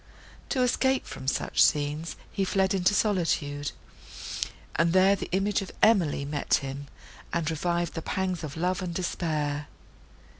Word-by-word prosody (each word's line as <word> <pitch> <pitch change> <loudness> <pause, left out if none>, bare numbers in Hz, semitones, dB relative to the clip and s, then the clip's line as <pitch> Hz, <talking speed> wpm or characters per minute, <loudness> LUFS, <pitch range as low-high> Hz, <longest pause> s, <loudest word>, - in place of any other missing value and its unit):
To 255 - +2
escape 265 +1 +2
from 135 0 -8
such 135 - +1
scenes, 150 +2 +1 0.2
he 195 - -1
fled 190 +1 +2
into 190 +1 +3
solitude, 155 -9 0 1.0
and 165 +2 +3
there 190 +1 +6
the - - -6
image 195 +3 +1
of 195 - -6
Emily 175 -10 +4
met 145 0 +1
him, 140 +1 -4 0.4
and 170 -3 -1
revived 170 +1 -1
the 165 - -4
pangs 185 -1 -2
of 150 0 -6
love 180 +3 0
and 175 -2 -4
despair. 150 -5 -1
170 Hz, 145 wpm, -28 LUFS, 150-190 Hz, 1.0 s, there